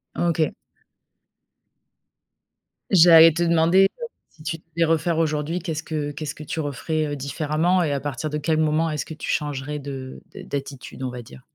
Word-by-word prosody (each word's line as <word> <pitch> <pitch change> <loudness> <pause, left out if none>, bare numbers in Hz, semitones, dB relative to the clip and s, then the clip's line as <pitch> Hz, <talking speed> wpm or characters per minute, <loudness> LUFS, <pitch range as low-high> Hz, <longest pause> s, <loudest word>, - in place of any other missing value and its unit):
OK. 165 -3 +1 2.4
J'allais 165 -2 +8
te 170 +2 0
demander, 170 +3 +4 0.2
heu, - - -2 0.2
si 155 - -18
tu 165 - -3 0.2
devais 170 0 +3
refaire 165 +1 +1
aujourd'hui, 155 +1 0
qu'est-ce 165 -3 -4
que 150 -3 -3
qu'est-ce 145 0 -6
que 155 - -9
tu 155 - -5
referais, 155 +2 -2
heu, 145 - -3
différemment 155 +6 0
et 155 - -1
à 140 - -1
partir 145 +2 -4
de 150 - -2
quel 155 +1 0
moment 155 +1 +1
est-ce 150 -1 -3
que - - -8
tu 155 - -7
changerais 145 0 -2
de 135 -2 -7
d'a - - -9
d'attitude, 140 -1 -6
on 130 - -2
va 125 0 -7
dire? 65 - -14
155 Hz, 175 wpm, -23 LUFS, 145-165 Hz, 2.4 s, J'allais